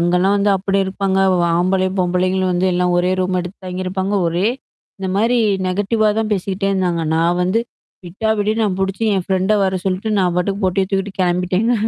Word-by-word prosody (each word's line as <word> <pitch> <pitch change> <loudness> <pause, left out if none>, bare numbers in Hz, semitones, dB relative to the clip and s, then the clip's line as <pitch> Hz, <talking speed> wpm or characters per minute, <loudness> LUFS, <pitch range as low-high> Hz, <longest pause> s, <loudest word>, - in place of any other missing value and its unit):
அங்கலாம் 180 +3 +2
வந்து 200 0 +2
அப்டி 195 +1 -1
இருப்பாங்க 190 0 -1 0.4
ஆம்பளை, 185 +2 +1
பொம்பளைகளும் 185 +1 +1
வந்து 180 +1 +1
எல்லாம் 180 0 +1
ஒரே 180 +1 +1
ரூம் 185 0 0
எடுத்து 180 +2 -8
தாங்கியிருப்பாங்க. 185 +2 -3
ஒரே 175 +4 0 0.5
இந்த 190 -1 -4
மாரி 230 +4 +2 0.3
நெகட்டிவ்வா 205 +4 +1
தான் 220 -1 -1
பேசிக்கிட்டே 195 0 -1
இருந்தாங்க. 180 -3 0
நான் 170 +2 +1
வந்து 185 +6 +1 0.4
விட்டா 195 +6 -4
விடு 205 +1 +1
நான் 200 -4 0
புடிச்சு 195 +3 -2
என் 190 -2 -1
ஃப்ரெண்ட 190 +2 +1
வர 190 0 0
சொல்லிட்டு, 190 +3 -1
நான் 180 -2 +2
பாட்டுக்கு 195 +3 -1
பொட்டிய 190 +1 +1
தூக்கிட்டு 195 0 -1
கெளம்பிட்டேங்க. 180 +6 +1
190 Hz, 170 wpm, -18 LUFS, 180-195 Hz, 0.5 s, அங்கலாம்